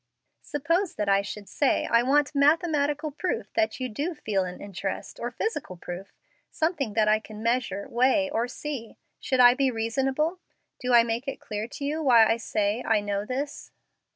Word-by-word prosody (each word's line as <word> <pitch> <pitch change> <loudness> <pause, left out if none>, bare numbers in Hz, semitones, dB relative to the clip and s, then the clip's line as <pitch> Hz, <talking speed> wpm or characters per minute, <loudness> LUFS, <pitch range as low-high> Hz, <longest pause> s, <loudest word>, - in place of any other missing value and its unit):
Suppose 330 +6 -1
that 210 -1 -2
I 195 0 +4
should 205 0 -7
say 275 +8 +1
I 235 - +4
want 285 +4 +2
mathematical 295 0 +2
proof 350 +6 -3
that 330 -4 0
you 255 - -2
do 290 +10 -3
feel 205 -9 -1
an 180 0 -7
interest, 195 -1 -5
or 240 - -2
physical 245 - -4
proof 175 +3 -7 0.4
something 315 - -1
that 215 -1 +3
I 215 0 +4
can 215 0 -10
measure, 230 -4 -1
weigh, 260 +5 +2
or 235 -4 -1
see 260 -4 -6 0.2
should 260 - -1
I 245 -1 +8
be 270 +1 +1
reasonable? 265 +9 -1 0.4
Do 250 -1 -2
I 235 - +8
make 235 +3 -3
it 270 - -4
clear 210 +1 -5
to 280 - -6
you 305 +3 -1
why 240 -6 +6
I 225 +1 +2
say 215 0 -1
I 220 -2 +3
know 205 0 -2
this?" 280 +3 -4
250 Hz, 180 wpm, -26 LUFS, 215-290 Hz, 0.4 s, I